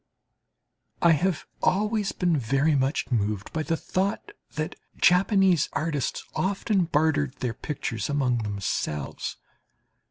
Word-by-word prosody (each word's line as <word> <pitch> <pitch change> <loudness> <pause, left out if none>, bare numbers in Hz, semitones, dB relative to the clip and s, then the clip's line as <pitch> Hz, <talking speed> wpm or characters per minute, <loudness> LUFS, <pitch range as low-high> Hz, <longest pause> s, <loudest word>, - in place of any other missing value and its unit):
I 170 - +7
have 170 +3 +1 0.2
always 210 +1 +1
been 175 -3 +1
very 135 +4 +2
much 135 0 0
moved 105 -3 -1
by 160 - -1
the 165 +1 -1
thought 190 +4 -2 0.2
that 155 0 -3 0.2
Japanese 185 -2 +4
artists 150 -4 -1
often 195 0 +1
bartered 150 -3 +1
their 125 -3 -3
pictures 115 -6 -4
among 130 -4 +1
themselves. 100 -9 -3
155 Hz, 115 wpm, -26 LUFS, 125-180 Hz, 0.2 s, I